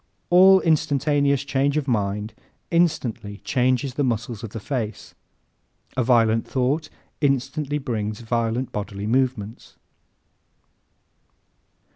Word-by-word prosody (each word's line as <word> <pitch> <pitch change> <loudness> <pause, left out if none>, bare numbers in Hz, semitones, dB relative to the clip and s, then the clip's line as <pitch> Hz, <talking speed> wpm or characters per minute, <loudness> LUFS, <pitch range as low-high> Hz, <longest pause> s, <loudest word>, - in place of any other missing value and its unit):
An 190 +2 +7
instantaneous 145 -3 +2
change 140 +1 0
of 150 -2 -1
mind 105 -2 -1 0.4
instantly 125 -12 0
changes 130 +1 +1
the 145 - -1
muscles 120 -2 -2
of 115 - -5
the 115 - -7
face. 110 -1 -4 0.8
A 130 - +1
violent 115 -2 +3
thought 140 +4 0 0.3
instantly 145 +1 0
brings 110 -6 -3
violent 115 +2 -1
bodily 100 -1 -5
movements. 120 -2 -1
130 Hz, 100 wpm, -23 LUFS, 110-145 Hz, 0.8 s, An